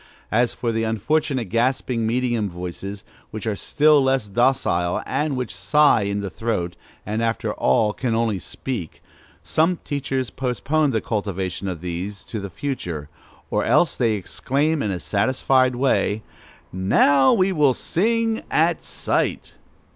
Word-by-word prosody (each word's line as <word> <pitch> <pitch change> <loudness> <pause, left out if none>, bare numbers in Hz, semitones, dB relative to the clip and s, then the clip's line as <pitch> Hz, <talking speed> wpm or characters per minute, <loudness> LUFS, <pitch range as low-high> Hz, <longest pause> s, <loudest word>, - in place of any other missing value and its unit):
As 120 +2 +2
for 120 - -1
the 115 0 -1
unfortunate 125 +2 0
gasping 120 0 0
medium 120 -3 0
voices, 90 +3 -6 0.3
which 110 0 -6
are 110 -2 0
still 150 +6 +4
less 130 -4 +1
docile, 100 -6 +1
and 150 -2 -1
which 125 -7 -3
sigh 115 +8 +4
in 100 0 -1
the 100 - -4
throat, 90 -6 -2 0.3
and 110 +2 -2
after 115 0 -1
all 105 +11 +2
can 120 -2 -1
only 115 -4 0
speak, 100 -2 -6 0.4
such 165 +3 +2
teachers 135 -3 -2
postpone 140 +4 0
the 110 -4 0
cultivation 100 -3 -3
of 90 -4 -4
these 90 +3 -5
to 110 - -5
the 100 0 -6
future, 85 - -4 0.4
or - - +1
else 175 - +3
they 115 -3 +2
exclaim 140 - -1
in 105 - -1
a 95 -2 -2
satisfied 130 +5 +2
way, 120 -4 +1 0.5
"Now 130 +9 +4
we 195 -4 +3
will 145 -7 +3
sing 225 +4 0
at - - +2
sight! - - -2
115 Hz, 145 wpm, -22 LUFS, 100-135 Hz, 0.5 s, still